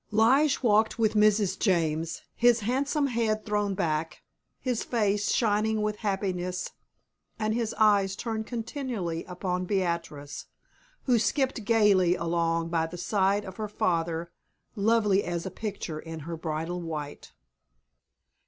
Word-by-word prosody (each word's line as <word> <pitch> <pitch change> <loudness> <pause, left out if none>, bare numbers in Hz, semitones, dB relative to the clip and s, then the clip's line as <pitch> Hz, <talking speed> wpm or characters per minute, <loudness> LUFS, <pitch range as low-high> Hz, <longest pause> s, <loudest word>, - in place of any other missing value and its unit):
Lige 260 +7 +3
walked 220 -1 +3
with 220 -2 +2
Mrs. 210 -2 +3
James, 165 -4 0
his 240 -1 +4
handsome 275 +6 0
head 225 -4 0
thrown 205 -2 0
back, 155 -2 -2 0.4
his 250 -3 -1
face 210 -3 0
shining 215 -1 +1
with 210 0 -1
happiness 185 -3 -2 0.7
and 215 0 0
his 230 -1 -2
eyes 200 -3 +3
turned 220 0 -4
continually 230 - -3
upon 180 0 -3
Beatrice, 170 -6 -3 0.6
who 245 -3 +3
skipped 260 -1 0
gayly 200 -5 +4
along 165 -1 0
by 165 -1 0
the 175 +2 -8
side 200 +2 +1
of 190 0 -9
her 215 -1 -4
father, 170 -3 -1 0.4
lovely 210 -2 +3
as 170 -1 -3
a 190 - -4
picture 200 -7 -5
in 160 0 -7
her 165 +3 -5
bridal 165 +2 -3
white. 155 -3 -6
200 Hz, 130 wpm, -28 LUFS, 170-220 Hz, 0.7 s, his